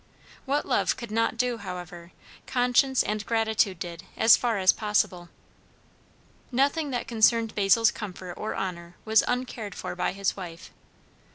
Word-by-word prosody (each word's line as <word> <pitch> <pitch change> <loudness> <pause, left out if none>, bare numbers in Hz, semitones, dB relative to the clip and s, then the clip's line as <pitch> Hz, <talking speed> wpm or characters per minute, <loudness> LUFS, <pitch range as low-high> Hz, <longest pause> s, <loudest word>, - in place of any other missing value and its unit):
What 285 +2 0
love - - +1
could 235 -3 -8
not 230 +1 0
do, 245 -1 0
however, 175 -2 -8 0.4
conscience 250 +1 +2
and 210 0 -2
gratitude 220 -4 +1
did 170 -1 -7
as 225 - +7
far 235 -3 -1
as 185 -1 +5
possible. 210 -5 -1 1.2
Nothing 280 +4 +1
that 245 -3 -3
concerned 225 0 +3
Basil's 210 +2 +4
comfort 185 -4 -7
or 215 - -5
honour 175 -2 -5
was 220 -1 +4
uncared 245 -6 -3
for - - -5
by 180 - -1
his 195 -1 -1
wife. 175 -3 -9
215 Hz, 145 wpm, -26 LUFS, 185-235 Hz, 1.2 s, as